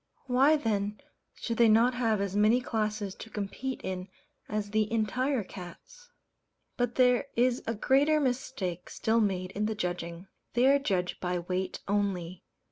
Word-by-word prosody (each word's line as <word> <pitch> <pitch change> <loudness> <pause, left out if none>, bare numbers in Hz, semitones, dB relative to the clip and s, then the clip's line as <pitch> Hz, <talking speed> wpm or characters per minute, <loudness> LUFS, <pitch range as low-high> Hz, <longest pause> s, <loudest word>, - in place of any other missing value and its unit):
Why 270 +4 +4
then 210 -6 -1 0.4
should 230 -1 -4
they 235 -1 +6
not 230 +4 +5
have 225 -4 +1
as 200 -1 -2
many 215 +4 +4
classes 215 -4 -2
to 225 - -10
compete 215 +6 -4
in 185 0 -4 0.4
as 210 -1 -2
the 215 0 +1
"entire" 230 +3 0
cats? 195 - -12 0.7
But 245 -1 -1
there 250 +1 +4
is 245 +1 +2
a 230 - -1
greater 285 +7 +3
mistake 245 - -2
still 225 +1 +1
made 185 -4 0
in 210 +2 -1
the 220 - -2
judging. 175 -2 -4 0.3
They 245 +1 +4
are 280 +1 +5
judged 185 -9 -1
by 180 0 -1
weight 180 +2 -3
only. 185 -3 -1
215 Hz, 155 wpm, -29 LUFS, 190-250 Hz, 0.7 s, they